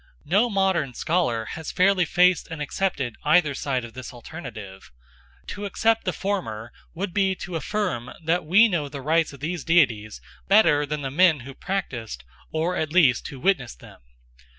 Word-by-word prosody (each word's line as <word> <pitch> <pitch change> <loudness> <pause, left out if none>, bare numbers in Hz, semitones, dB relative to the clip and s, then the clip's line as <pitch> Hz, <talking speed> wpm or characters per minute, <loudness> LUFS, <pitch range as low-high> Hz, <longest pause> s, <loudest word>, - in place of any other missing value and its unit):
No 205 +10 +3
modern 190 - 0
scholar 140 -10 0
has 160 -1 -6
fairly 185 -1 +3
faced 180 +2 +3
and 160 -2 -6
accepted 145 -5 -2
either 150 -1 +3
side 130 -3 -2
of 115 - -12
this 130 -1 -8
alternative. 110 - -10 0.6
To 205 0 -5
accept 225 +3 +1
the 185 - +1
former 170 - -4 0.2
would 185 +1 -4
be 195 -2 +2
to 180 -1 -7
affirm 160 - -2
that 170 +3 +1
we 190 +9 +6
know 165 -8 -2
the 140 -2 -8
rites 160 +2 +2
of 140 -2 -13
these 165 +1 -3
deities 120 -11 +2 0.3
better 150 -8 +4
than 150 0 -3
the 135 - -3
men 160 -2 +4
who 135 +3 -9
practised, 120 - -4 0.3
or 165 +3 -1
at 155 -3 -2
least 155 -9 +3
who 135 - -9
witnessed 130 - 0
them. - - -15
160 Hz, 170 wpm, -24 LUFS, 130-185 Hz, 0.6 s, we